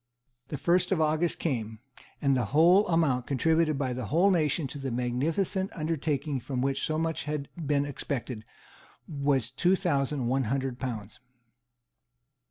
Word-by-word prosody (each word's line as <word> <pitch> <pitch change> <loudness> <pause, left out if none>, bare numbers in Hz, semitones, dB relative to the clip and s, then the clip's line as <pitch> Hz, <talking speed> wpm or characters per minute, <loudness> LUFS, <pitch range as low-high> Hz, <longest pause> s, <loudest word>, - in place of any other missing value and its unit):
The 145 - -4
first 175 +6 +2
of 185 - +2
August 155 +2 +1
came; 115 -8 -2 0.5
and 140 -1 +3
the 125 -3 +1
whole 180 +6 +6
amount 155 -8 +1
contributed 155 +2 +2
by 130 -2 -1
the 125 -3 -4
whole 175 - +3
nation 160 -3 +1
to 145 - -7
the 135 -1 -3
magnificent 150 - -1
undertaking 150 -3 -1
from 125 +1 -4
which 135 +1 0
so 155 - 0
much 165 0 -1
had 150 -2 -3 0.2
been 145 -1 +2
expected 130 -5 -4 0.6
was 140 -5 0
two 180 +8 +3
thousand 145 -7 0
one 130 +2 +1
hundred 130 +1 -2
pounds. 110 -5 -5
145 Hz, 150 wpm, -28 LUFS, 130-165 Hz, 0.6 s, whole